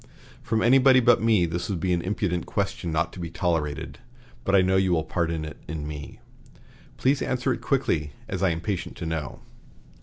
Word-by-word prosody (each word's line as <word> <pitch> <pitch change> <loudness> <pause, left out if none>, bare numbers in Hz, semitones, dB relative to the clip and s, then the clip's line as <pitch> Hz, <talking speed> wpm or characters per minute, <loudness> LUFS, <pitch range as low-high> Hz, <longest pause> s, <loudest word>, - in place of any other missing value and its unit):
From 110 0 0
anybody 130 +1 +6
but 120 -2 +4
me 110 -6 +4
this 85 +6 -3
would 95 -4 -1
be 90 +2 +1
an 85 - 0
impudent 90 -2 -2
question 85 - -2
not 80 +2 0
to - - -9
be 85 -1 -4
tolerated, 80 -3 -2 0.4
but 100 - +2
I 95 - +6
know 95 +1 +2
you 95 -1 +3
will 80 -2 +1
pardon 85 -1 -2
it 75 -1 -8
in 75 -1 -4
me. 75 -1 -8 0.8
Please 135 +2 +2
answer 130 0 0
it - - -6
quickly, 80 - 0
as 95 -1 -4
I 95 - +3
am - - +1
impatient 90 +3 -4
to - - -5
know." 80 -5 -4
90 Hz, 195 wpm, -25 LUFS, 80-110 Hz, 0.8 s, anybody